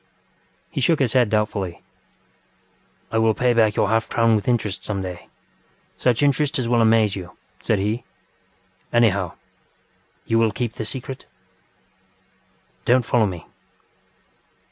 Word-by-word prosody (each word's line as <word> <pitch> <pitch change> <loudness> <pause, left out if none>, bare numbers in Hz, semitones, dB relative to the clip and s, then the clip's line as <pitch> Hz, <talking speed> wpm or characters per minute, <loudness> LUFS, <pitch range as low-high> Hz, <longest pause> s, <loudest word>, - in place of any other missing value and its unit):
He - - -3
shook 160 +5 +3
his 130 -6 +1
head 125 -4 +3
doubtfully. 105 -5 -2 1.3
ŌĆ£I 110 - +1
will 110 -1 +3
pay 125 +3 +2
back 110 -3 +3
your - - +2
half 115 0 +1
crown 115 -1 +3
with 105 - -2
interest 110 -5 -1
some 100 -2 -3
dayŌĆösuch 110 +6 -5
interest 145 +2 +2
as 125 -3 -1
will 120 0 +3
amaze 110 -2 +3
you, 90 -3 -6 0.3
ŌĆØ - - -25
said 110 - +1
he. 105 +5 -2 0.9
ŌĆ£Anyhow, 100 -7 +2 0.9
you 115 - +2
will 115 -1 +3
keep 115 +2 -3
the 110 - -5
secret?.... 130 +3 -6 1.6
DonŌĆÖt 125 0 +4
follow 115 -2 +2
me. 90 -4 -7
115 Hz, 135 wpm, -22 LUFS, 105-120 Hz, 1.6 s, DonŌĆÖt